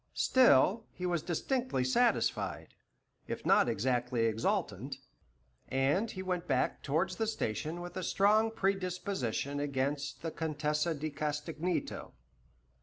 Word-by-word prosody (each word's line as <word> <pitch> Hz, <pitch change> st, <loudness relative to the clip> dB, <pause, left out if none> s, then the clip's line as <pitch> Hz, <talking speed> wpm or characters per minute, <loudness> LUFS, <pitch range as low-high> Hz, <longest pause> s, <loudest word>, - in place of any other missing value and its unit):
Still, 225 Hz, -, +4 dB
he 180 Hz, -, -5 dB
was 175 Hz, -3 st, 0 dB
distinctly 240 Hz, -, -1 dB
satisfied, 130 Hz, 0 st, +1 dB, 0.5 s
if -, -, -5 dB
not -, -, +5 dB
exactly 125 Hz, +1 st, 0 dB
exultant, 125 Hz, -, -1 dB, 0.7 s
and 140 Hz, +12 st, +1 dB
he 185 Hz, -, -6 dB
went 180 Hz, -2 st, -2 dB
back 130 Hz, -3 st, 0 dB
towards 170 Hz, +6 st, 0 dB
the 225 Hz, -, 0 dB
station 160 Hz, -, -2 dB
with 175 Hz, 0 st, -8 dB
a 185 Hz, -, -2 dB
strong 210 Hz, +4 st, +3 dB
predisposition 185 Hz, -, -1 dB
against 140 Hz, +1 st, -2 dB
the 165 Hz, -, -2 dB
Contessa 155 Hz, +1 st, -1 dB
di 155 Hz, +1 st, -4 dB
Castagneto. 155 Hz, +4 st, -3 dB
160 Hz, 115 wpm, -32 LUFS, 135-185 Hz, 0.7 s, not